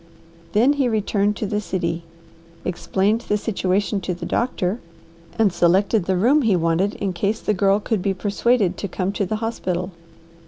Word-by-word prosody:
Then 245 +7 +4
he 275 -4 +1
returned 210 -1 +1
to 215 - -3
the 210 +1 -1
city, 170 -4 -2 0.6
explained 195 +5 0
the 210 - +3
situation 200 -1 -1
to 180 0 -3
the 175 0 -7
doctor, 210 -1 -1 0.6
and 210 -5 +3
selected 190 +3 +3
the 185 0 +1
room 260 +11 +4
he 220 -7 +3
wanted 170 +4 +1
in 195 -2 -2
case 200 +5 -1
the 215 - 0
Girl 195 +1 +3
could 215 -1 -1
be 195 0 0
persuaded 205 0 +1
to 200 - -3
come 185 +1 -2
to 200 -1 -2
the 215 - -1
hospital. 185 -5 -3
200 Hz, 170 wpm, -22 LUFS, 185-215 Hz, 0.6 s, Then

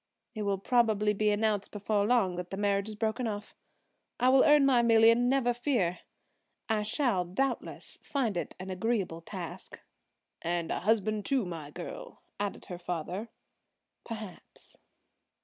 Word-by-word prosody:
It 215 - -5
will 200 -1 0
probably 215 -1 +2
be 210 +1 +1
announced 210 -1 0
before 205 0 0
long 220 -7 +3
that 180 0 -5
the 195 - -5
marriage 200 0 +1
is 215 - -6
broken 225 +3 -1
off. 205 -1 -5 0.6
I 250 +1 +4
will 265 0 +6
earn 295 -2 +6
my 255 -3 +5
million, 230 +1 +5
never 255 -2 +2
fear. 235 -9 0 0.7
I 220 -2 +1
shall, 215 -3 +1
doubtless, 240 +9 -3
find 245 -8 -1
it 175 - -3
an 185 +1 -6
agreeable 185 -4 -1
task." 175 -1 -8 0.6
"And 170 -1 -2
a - - -1
husband, 215 +1 +1
too, 265 -6 +1
my 165 -5 -6
girl," 170 +3 -9 0.2
added 205 -1 -3
her 175 -1 -7
father. 180 +5 -4 0.7
"Perhaps." 215 -5 -9
210 Hz, 150 wpm, -30 LUFS, 185-235 Hz, 0.7 s, will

